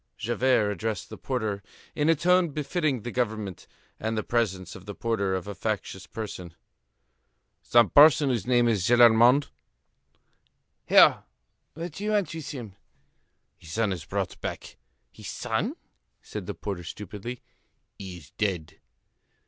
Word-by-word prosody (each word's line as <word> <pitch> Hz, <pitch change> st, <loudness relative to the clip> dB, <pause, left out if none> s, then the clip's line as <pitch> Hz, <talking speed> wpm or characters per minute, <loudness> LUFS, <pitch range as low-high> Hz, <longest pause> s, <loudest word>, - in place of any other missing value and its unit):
Javert 120 Hz, -2 st, +1 dB
addressed 105 Hz, 0 st, -3 dB
the -, -, -8 dB
porter 110 Hz, -6 st, -2 dB, 0.3 s
in 150 Hz, +1 st, +1 dB
a 165 Hz, -, +5 dB
tone 180 Hz, +2 st, +3 dB
befitting 145 Hz, -, -1 dB
the 120 Hz, -, -4 dB
government, 110 Hz, -6 st, -3 dB, 0.3 s
and 110 Hz, 0 st, -2 dB
the 110 Hz, -, -1 dB
presence 95 Hz, -7 st, -1 dB
of 95 Hz, +1 st, -12 dB
the 105 Hz, -, -6 dB
porter 100 Hz, -5 st, -1 dB
of 95 Hz, +1 st, -4 dB
a 100 Hz, -, -4 dB
factious 100 Hz, -1 st, -4 dB
person. 90 Hz, -6 st, -7 dB, 1.1 s
"Some 120 Hz, -1 st, +4 dB
person 145 Hz, -1 st, +7 dB
whose 120 Hz, -5 st, -1 dB
name 120 Hz, -1 st, +4 dB
is 105 Hz, -6 st, +1 dB
Gillenormand?" 120 Hz, +3 st, +6 dB, 1.4 s
"Here. -, -, +7 dB, 0.5 s
What 165 Hz, +2 st, -5 dB
do 195 Hz, -, -8 dB
you 210 Hz, -, -1 dB
want 205 Hz, -5 st, 0 dB
with 160 Hz, -3 st, -6 dB
him?" 115 Hz, -9 st, -7 dB, 0.8 s
"His 80 Hz, -, -11 dB
son 110 Hz, -2 st, +1 dB
is 85 Hz, -5 st, -6 dB
brought -, -, -4 dB
back." -, -, -6 dB, 0.4 s
"His -, -, -11 dB
son?" -, -, -2 dB, 0.4 s
said -, -, -8 dB
the -, -, -4 dB
porter 95 Hz, -4 st, -5 dB
stupidly. 105 Hz, +7 st, -7 dB, 0.6 s
"He 95 Hz, -2 st, -7 dB
is 75 Hz, -6 st, -15 dB
dead." 95 Hz, -7 st, -3 dB
115 Hz, 145 wpm, -27 LUFS, 100-130 Hz, 1.4 s, person